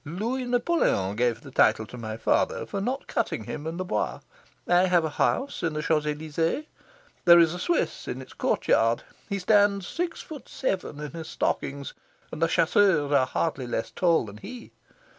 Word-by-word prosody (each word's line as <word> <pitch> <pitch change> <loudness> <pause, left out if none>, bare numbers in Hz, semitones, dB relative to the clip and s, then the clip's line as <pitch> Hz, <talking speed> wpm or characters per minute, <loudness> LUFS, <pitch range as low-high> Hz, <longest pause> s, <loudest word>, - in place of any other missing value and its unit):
Louis 225 - -3
Napoleon 245 - +1
gave 120 0 0
the 135 - -12
title 110 -3 +3
to 125 - -11
my 110 -2 -5
father 115 - +1
for 200 - -4
not 255 +6 -2
cutting - - -2
him 150 - -6
in 165 +1 -4
the 185 - -3
Bois. 105 - -2 0.5
I 180 +1 +4
have 175 -3 +3
a 155 - -3
house 275 - 0
in 165 -2 -1
the 150 0 -3
Champs 150 -1 +1
Elysees. 160 - -1 0.6
There 170 -1 +9
is 165 -1 +5
a 180 - -5
Swiss 345 - -1
in 125 - -4
its 130 - -11
courtyard. 115 +1 +1 0.3
He 200 - -1
stands 200 0 +3
six 345 0 -3
foot 305 -3 -10
seven 190 - -3
in 150 -1 -6
his 165 -1 -7
stockings, 140 0 -2 0.4
and 155 - -7
the 165 - +4
chasseurs 165 -3 +3
are 135 -3 +4
hardly 135 -2 -2
less 115 -1 -3
tall 170 -7 +2
than 105 0 -10
he. 240 - -10
165 Hz, 185 wpm, -26 LUFS, 140-200 Hz, 0.6 s, There